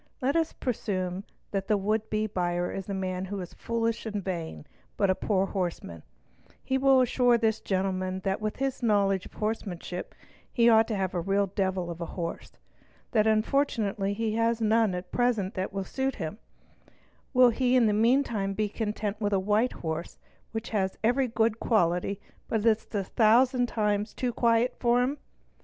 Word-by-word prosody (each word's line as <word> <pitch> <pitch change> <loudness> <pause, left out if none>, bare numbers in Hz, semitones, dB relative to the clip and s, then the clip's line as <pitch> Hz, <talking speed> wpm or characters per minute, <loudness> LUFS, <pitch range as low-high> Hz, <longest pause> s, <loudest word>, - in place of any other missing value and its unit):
Let 275 +2 0
us 325 -1 +2
presume 190 -5 -3 0.3
that 195 -1 -2
the 210 - +3
would 215 +2 -1
be 215 0 0
buyer 175 -3 -1
is 195 0 -6
aman 190 -1 -2
who 200 +1 -5
is 180 - -7
foppish 230 0 -2
and 205 -2 -3
vain 170 -5 -5 0.3
but 200 -2 +3
a - - +4
poor 195 0 0
horseman; 175 - -4 0.6
he 265 - -1
will 265 -1 +5
assure 245 -1 +3
this 225 -1 +1
gentleman 185 -1 -1
that 195 +1 -1
with 215 0 -2
his 270 -1 -2
knowledge 200 -4 +2
of - - -17
horsemanship 195 -5 -4 0.4
he 235 -1 +3
ought 225 -1 +6
to 220 - -2
have 190 -2 -1
a 175 - -1
real 195 +3 +1
devil 190 -2 -2
of 170 0 -8
a 170 - -3
horse, 170 -1 -5 0.6
that 220 -3 +3
unfortunately 215 -3 +1
he 225 0 -1
has 230 +1 +1
none 220 -3 +2
at 180 0 -7
present 230 -6 +1
that 185 0 -3
will 195 0 -3
quite - - -15
suit 265 0 -1
him; 165 +7 -5 0.9
will 250 -2 +6
he 250 +1 +1
in 250 -2 +5
the 210 - +3
mean 235 +6 +4
time 195 -6 -3
be 210 0 0
content 210 0 -3
with 205 -1 0
a 195 - +3
white 210 +6 +1
horse 160 +1 -4 0.3
which 225 +1 -5
has 190 -3 -1
every 250 +4 +2
good 225 -1 +1
quality 180 -2 +1 0.3
but 220 -1 -1
is 225 -1 +2
a 200 - +1
thousand 245 +5 +3
times 210 -2 -1
too 250 -2 -1
quiet 235 +1 +2
for 240 0 +3
him? 275 +4 -2
210 Hz, 185 wpm, -28 LUFS, 190-230 Hz, 0.9 s, ought